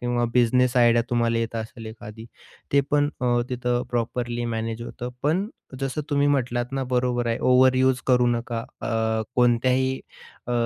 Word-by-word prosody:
किंवा 120 0 0
business 125 +1 +3
idea 120 -1 +5
तुम्हाला 115 -1 +1
येत 115 0 -2
असेल 115 0 -6
एखादी, 110 0 -10 0.5
ते 140 - +5
पण 145 0 +3
अ, 125 - 0 0.2
तिथे 125 -1 -1
प्रॉपरली 120 0 -2
मॅनेज 115 0 -3
होतं. 120 +1 -6
पण 180 +8 +1 0.3
जसं 135 +2 -2
तुम्ही 145 0 +2
म्हटलात 125 -2 0
ना, 135 -1 -1
बरोबर 125 -1 0
आहे. 115 - 0
ओव्हर 130 0 +4
यूज 130 0 +3
करू 125 -1 +4
नका 120 -1 -2 0.2
अ, - - -4 0.5
कोणत्याही 125 +2 +3 0.5
अ, 120 - -2
120 Hz, 160 wpm, -24 LUFS, 120-130 Hz, 0.5 s, idea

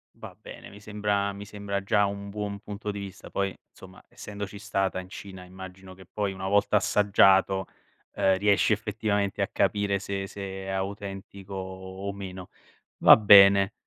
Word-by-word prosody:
Va - - -11
bene, - - -11
mi 100 +1 -14
sembra 105 -1 -1
mi 100 +1 -9
sembra 100 -1 -4
già 105 +1 +2
un 100 0 -5
buon 100 0 -5
punto 105 0 -6
di 100 - -6
vista, 100 -2 -9
poi 100 -1 -2
insomma, 95 -1 -16
essendoci 100 0 -8
stata 95 -4 -2
in 90 - -9
Cina 95 -1 -10
immagino 95 0 -11
che 95 0 -15
poi 100 -2 -3
una 95 0 -5
volta 100 +1 +2
assaggiato, 95 -2 +3 0.5
ehm, 95 -1 +2
riesci 100 +2 +3
effettivamente 105 -2 -2
a - - +1
capire 100 -1 0
se 100 0 -4
se 95 -1 -7
è - - -8
autentico 95 0 -6
o 95 +1 -7
o - - -1
meno. 95 -2 -8 0.5
Va - - +9
bene. 100 -2 +7
100 Hz, 165 wpm, -26 LUFS, 95-100 Hz, 0.5 s, Va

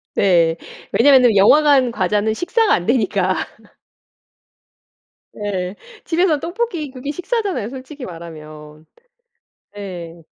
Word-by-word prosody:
네. 170 -4 +3 0.4
왜냐면은 255 -5 +5
영화관 270 +5 +5
과자는 210 +1 0
식사가 410 - +1
안 175 - 0
되니까. 200 -5 +1 2.0
네. 195 -2 -4 0.3
집에서 330 -2 +1
떡볶이 345 - -4
그게 260 +2 -7
식사잖아요 375 - -3
솔직히 265 +1 -9
말하면. 155 -3 -11 0.9
네. 175 -5 -8
220 Hz, 225 characters per minute, -19 LUFS, 180-295 Hz, 2.0 s, 왜냐면은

